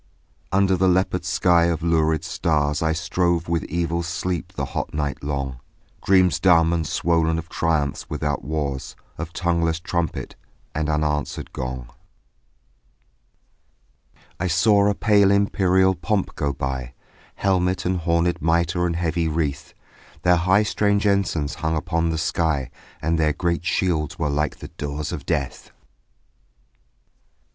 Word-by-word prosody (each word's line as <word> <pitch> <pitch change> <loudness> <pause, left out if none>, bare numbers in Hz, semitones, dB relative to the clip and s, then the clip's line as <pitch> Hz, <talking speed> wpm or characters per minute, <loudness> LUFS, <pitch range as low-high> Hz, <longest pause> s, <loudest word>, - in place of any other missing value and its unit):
Under 95 0 +3
the 95 +1 +2
leopard 90 0 +1
sky 85 -1 +3
of 85 -1 -1
lurid 80 -2 +2
stars 75 -2 0
I 80 0 +2
strove 85 +1 0
with 85 -1 0
evil 85 +1 -1
sleep 85 +1 -3
the - - -3
hot - - -3
night 75 -2 -2
long, 70 -3 -3 0.4
Dreams 95 -2 +4
dumb 85 -3 +4
and 80 -2 -1
swollen 80 -1 +1
of 80 +1 -6
triumphs 80 -4 -1
without 75 -3 -2
wars, 70 -2 -3 0.2
Of 80 0 -5
tongueless 85 -2 0
trumpet 85 -2 -3 0.4
and 80 0 -1
unanswering 75 -1 -1
gong. 65 -1 -5 2.5
I 95 - 0
saw 100 +4 +4
a 100 - 0
pale 100 -3 +4
imperial 95 -2 +3
pomp 95 +3 -1
go 70 - -1
by, 65 -2 -4 0.4
Helmet 95 -1 0
and 90 0 0
hornèd 85 +1 +1
mitre 85 +2 +1
and 85 - -2
heavy 85 -1 0
wreath; 75 -3 -2 0.5
Their 90 0 +5
high 95 +5 +3
strange 105 -1 +1
ensigns 95 -7 0
hung 80 0 0
upon 85 0 0
the 80 - -1
sky 80 -5 0 0.3
And 80 +1 +1
their 75 -1 +2
great 85 0 -1
shields 80 -5 0
were 75 -3 -1
like 75 +1 -1
the 75 - -9
doors 75 -2 -5
of - - -6
death. - - -2
85 Hz, 135 wpm, -23 LUFS, 75-90 Hz, 2.5 s, Their